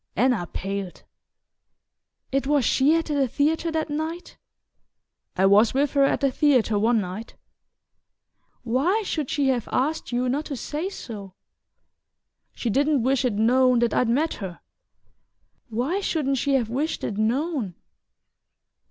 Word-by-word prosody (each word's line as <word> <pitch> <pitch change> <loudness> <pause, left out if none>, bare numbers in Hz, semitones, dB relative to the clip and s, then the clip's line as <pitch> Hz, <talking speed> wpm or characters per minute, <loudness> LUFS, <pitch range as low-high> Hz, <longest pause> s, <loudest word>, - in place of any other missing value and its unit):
Anna 235 -6 +1
paled. 195 -1 -5 1.3
"It 270 0 0
was 290 -4 +2
she 285 +4 +3
at 330 -1 0
the 285 -3 0
theatre 310 +6 0
that 315 -1 -2
night?" 320 +4 -4 1.0
"I 190 - +3
was 210 +5 +5
with 280 +1 +2
her 280 -1 +4
at - - 0
the 275 -1 +2
theatre 250 -7 +2
one 225 +2 +3
night." 200 +4 -6 1.3
"Why 285 - +1
should 310 -8 -3
she 280 -3 +1
have 245 -4 -1
asked 300 +4 -1
you 245 +1 0
not 285 +5 -1
to 285 - -5
say 305 +8 -4
so?" 200 - -9 1.2
"She 235 - -3
didn't 285 +1 +2
wish 265 +1 +1
it 250 -4 +1
known 250 +4 +3
that 235 0 +1
I'd 245 - +2
met 300 +7 +1
her." 180 -3 -7 1.1
"Why 255 - -1
shouldn't 280 -8 -1
she 280 +1 +1
have 245 -4 +1
wished 295 +6 -2
it 210 -1 -3
known?" 245 - -1
260 Hz, 145 wpm, -24 LUFS, 225-295 Hz, 1.3 s, was